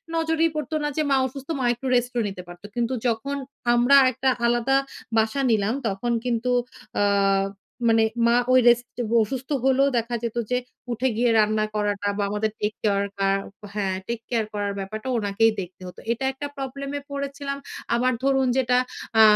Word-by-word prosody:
নজরেই 325 0 +2
পড়তো 305 +1 -3
না - - +1
যে 310 - +3
মা 270 - +5
অসুস্থ 275 +3 -10
মা - - -1
একটু 260 +3 -6
রেস্টও 245 0 +1
নিতে 190 -2 -6
পারত। 175 +2 -12
কিন্তু 240 +1 0
যখন 240 +5 -1 0.4
আমরা 245 +4 +5 0.2
একটা 260 +1 0 0.2
আলাদা 240 +3 +2 0.4
বাসা 220 +5 +2
নিলাম 215 0 +2
তখন 200 +4 -2
কিন্তু 245 0 0 0.5
আ - - +3 0.9
মানে 225 0 +5 0.2
মা 235 - +4 0.2
ওই 255 - +7
রেস্ট 240 +1 +1 0.3
অসুস্থ 260 +5 -5
হলেও 270 +1 +4
দেখা 235 +1 -1
যেত 235 0 -3
যে 250 - +3 0.3
উঠে 240 +3 0
গিয়ে 240 0 +3
রান্না 215 0 +2
করাটা 205 -1 0
বা 205 - 0
আমাদের 210 +1 -1
টেক-কেয়ার 205 -1 0
কা 195 0 +1 0.5
হ্যাঁ 195 -2 0
টেক 235 -1 -2
কেয়ার 230 -3 +1
করার 205 -1 -2
ব্যাপারটা 215 +5 -6
ওনাকেই 210 +1 +2
দেখতে 180 +1 -10
হতো। 180 - -10
এটা 265 +3 -1
একটা 285 +2 -5
প্রবলেমে 275 +1 -4
পড়েছিলাম। 280 0 -4 0.4
আবার 255 +2 +2
ধরুন 270 -1 +3
যেটা 250 -1 +3 0.4
আ - - +10
240 Hz, 165 wpm, -24 LUFS, 215-270 Hz, 0.9 s, আ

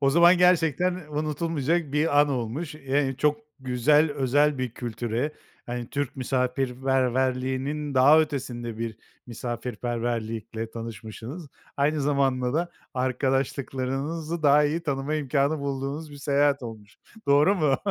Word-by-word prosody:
O 135 -1 +3
zaman 170 +3 +6
gerçekten 180 0 +3
unutulmayacak 155 0 -1
bir 150 -1 +3
an 145 - +3
olmuş. 135 +5 -3
Eee, 135 -1 0
çok 150 0 +2 0.2
güzel, 145 +5 +3
özel 145 +1 +2
bir 130 -2 -2
kültüre, 120 +4 -3 0.3
hani, 120 0 -5
Türk 145 -2 -3
misafirperverliğinin 130 +2 0
daha 145 +5 +7
ötesinde 120 -6 -3
bir 115 -1 -4 0.3
misafirperverlikle 115 -1 -4
tanışmışsınız. 115 +7 -7 0.3
Aynı 150 +2 +1
zamanda 135 -2 +1
da 170 +2 0 0.2
arkadaşlıklarınızı 135 +4 -1
daha 145 +1 +6
iyi 160 +3 0
tanıma 140 0 -2
imkânı 145 +1 +1
bulduğunuz 140 +2 -4
bir 145 - -10
seyahat 140 -1 +2
olmuş. 110 -3 -9 0.3
Doğru 145 +8 +5
mu? 150 -7 +2
135 Hz, 115 wpm, -26 LUFS, 125-150 Hz, 0.3 s, daha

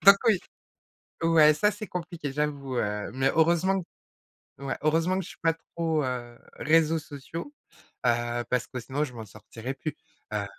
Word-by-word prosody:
donc 200 0 +10
oui. 215 -5 +5 0.8
Ouais, 160 -2 +7
ça 210 +7 +3
c'est 210 +1 -6
compliqué, 170 -6 -4
j'avoue, 140 -3 -2
heu, 105 -1 -1
mais 135 +1 +2
heureusement 170 +4 +3
q 175 - -9 0.8
ouais, 135 -1 -3
heureusement 165 +4 +2
que - - 0
je - - -9
suis - - -12
pas 165 -1 +3 0.2
trop, 160 -3 +1
heu, 120 -2 -4 0.2
réseaux 160 +1 +3
sociaux, 155 - -7 0.5
heu, 120 0 +1
parce 125 -3 +1
que 125 - -5
sinon 135 +5 -2
je 130 - -5
m'en 115 -2 -7
sortirai 110 +5 -7
plus, 150 +2 -4 0.4
heu 105 -1 0
150 Hz, 170 wpm, -28 LUFS, 125-165 Hz, 0.8 s, donc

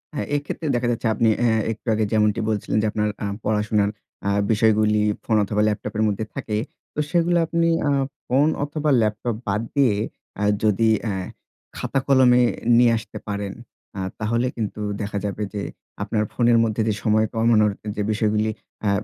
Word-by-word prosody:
হ্যাঁ - - -2
এক্ষেত্রে 145 +2 -4
দেখা 120 0 0
যাচ্ছে 115 0 -1
আপনি 115 0 +2 0.2
আ - - +5 0.2
একটু 110 +2 -9
আগে 110 0 +1
যেমনটি 105 -1 +2
বলছিলেন 105 0 -1
যে 110 - +1
আপনার 105 0 0
আ - - -1 0.2
পড়াশোনার 105 -1 +1 0.6
বিষয়গুলি 110 -1 +3 0.4
অথবা 105 +1 0
ল্যাপটপের 105 0 -1
মধ্যে 105 +1 -1
থাকে। 105 - -3 0.4
তো - - -4
সেগুলো 175 +1 +2
আপনি 170 +1 +1 0.2
আ - - +2 0.4
ফোন 140 +4 +3 0.2
অথবা 150 +1 -2
ল্যাপটপ 110 +2 -1
বাদ 105 +2 0
দিয়ে 130 -7 +4 0.7
যদি 110 +1 +3 0.2
আ - - 0 0.7
খাতা-কলমে 130 -2 +3 0.4
নিয়ে 120 -1 +6
আসতে 110 - -8
পারেন 100 -1 -3 0.7
তাহলে 115 +3 0
কিন্তু 110 -2 -4 0.2
দেখা 100 0 -3
যাবে 105 +1 -3
যে 100 - -3 0.4
আপনার 105 +1 0
ফোনের 120 -1 +4
মধ্যে 110 0 0
যে 110 - +2
সময় 110 0 +3
কমানোর 110 -2 +3 0.2
যে - - -2
বিষয়গুলি 110 0 +1 0.4
আ - - +4
110 Hz, 150 wpm, -23 LUFS, 105-120 Hz, 0.7 s, নিয়ে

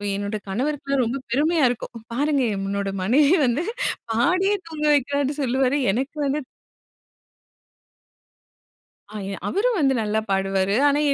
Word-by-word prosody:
என்னோட 205 +2 -3
கணவருக்குலாம் 275 +4 -1
ரொம்ப 245 +4 -2
பெருமையா 305 +4 +2
இருக்கும். 245 - -5 0.2
பாருங்க 285 +1 +1
என்னோட 195 0 -2
மனைவி 280 - +4
வந்து 250 +7 0 0.5
பாடியே 365 - +2
தூங்க 305 -2 -4
வைக்கிறான்னு 285 0 +1
சொல்லுவார். 260 +1 +1 0.2
எனக்கு 265 +8 -3
வந்து 280 +2 0 2.7
ஆய 195 -2 -5
அவரும் 455 +4 +1
வந்து 270 -3 +3
நல்லா 215 0 0
பாடுவாரு. 195 +1 +1
ஆனா, 290 +1 +2
270 Hz, 115 wpm, -23 LUFS, 215-295 Hz, 2.7 s, மனைவி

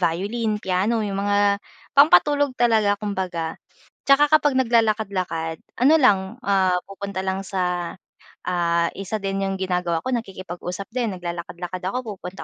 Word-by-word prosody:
violin, 205 +6 0
piano 210 +3 0
yung 200 -1 -2
mga 205 0 +2 0.3
pampatulog 285 -1 +5
talaga 220 -4 +3
kumbaga. 185 -6 -4 0.5
'Tsaka 290 +2 +5
kapag 295 -3 +4
naglalakad-lakad 205 -9 0 0.2
ano 275 +6 +5
lang, 210 -8 +5 0.2
ah, 195 -5 +2 0.2
pupunta 200 -1 -5
lang 190 +1 -2
sa, 180 -2 -2 0.5
ah, 170 -1 +1
isa 200 +2 -5
din 195 0 -1
yung 195 - -2
ginagawa 180 -3 -1
ko, 260 - -2
nakikipag-usap 185 -3 -5
din, 235 -5 -2
naglalakad-lakad 175 +1 -6
ako, 205 +2 -4
pupunta 180 +2 -8
195 Hz, 130 wpm, -23 LUFS, 180-225 Hz, 0.5 s, pampatulog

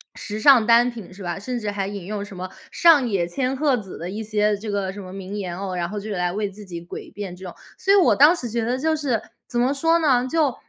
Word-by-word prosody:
时 210 0 -6
尚 240 -2 +6
单 240 +1 +5
品 225 -7 -10
是 190 +1 -11
吧， 175 +1 -3
甚 250 +5 -4
至 210 -2 -3
还 200 -1 -2
引 200 -3 -6
用 205 +1 -4
什 205 -2 -10
么 185 +1 -4 0.2
上 315 -7 +5
野 195 -6 0
千 255 +8 -1
鹤 285 -2 +2
子 200 -6 -7
的 175 +2 -6
一 210 +3 -4
些 210 -1 +1
这 215 +2 -7
个 200 -2 -1
什 205 - -8
么 185 -1 -9
名 195 +1 -7
言 180 -4 -4
哦， 190 -2 -4
然 175 -1 -2
后 210 +1 -4
就 205 - -8
是 205 - -2
来 180 -1 0
为 205 +2 -2
自 205 +2 -12
己 170 -2 -8
诡 - - -9
辩 195 -3 -6
这 185 - -13
种。 180 - -8 0.2
所 390 - +2
以 400 - +7
我 370 - +5
当 295 +5 +7
时 255 -8 -5
觉 230 0 -2
得 245 +3 0
就 315 +4 +1
是 275 -7 0 0.3
怎 240 - -2
么 255 +3 +2
说 325 +4 +3
呢？ 260 -6 +2
就 295 -3 +1
210 Hz, 305 characters per minute, -23 LUFS, 190-255 Hz, 0.3 s, 以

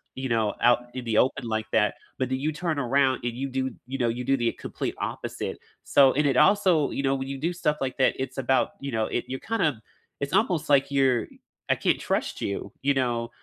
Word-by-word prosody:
you 130 0 -4
know, 110 -3 +1
out 120 0 +4
in 130 0 -5
the 115 -2 0
open 130 +1 +2
like 110 -1 -1
that, 105 -2 +3 0.2
but 130 -1 0
then 130 0 -1
you 150 +3 0
turn 165 0 -2
around 135 0 +2
and 120 -1 -2
you 135 +3 -4
do 130 0 -2 0.2
you 135 +1 -4
know, 120 -3 +1
you 120 +2 -3
do 135 +2 +2
the 120 -2 +1
complete - - -5
opposite, - - -4 0.3
so 135 -2 +5
and 150 +1 +2
it 135 -2 +2
also, 185 -4 +4
you - - -2
know, 135 0 +2
when 135 0 -4
you 135 0 -4
do 165 +5 0
stuff 150 -4 0
like 130 -1 -2
that, 130 - +3
it's 130 - -4
about, 135 0 +2
you 140 0 -4
know, 110 -2 0
it - - -2
you're 130 0 -4
kinda 155 - -1 0.4
it's 140 0 -3
almost 170 -8 +1
like 140 -1 +4
you're 135 -4 +2 0.4
I - - +4
can't - - +1
trust - - -2
you, 100 - -3
you 140 +1 +3
know 135 -1 +2
know 120 -1 -2
135 Hz, 235 wpm, -26 LUFS, 120-140 Hz, 0.4 s, so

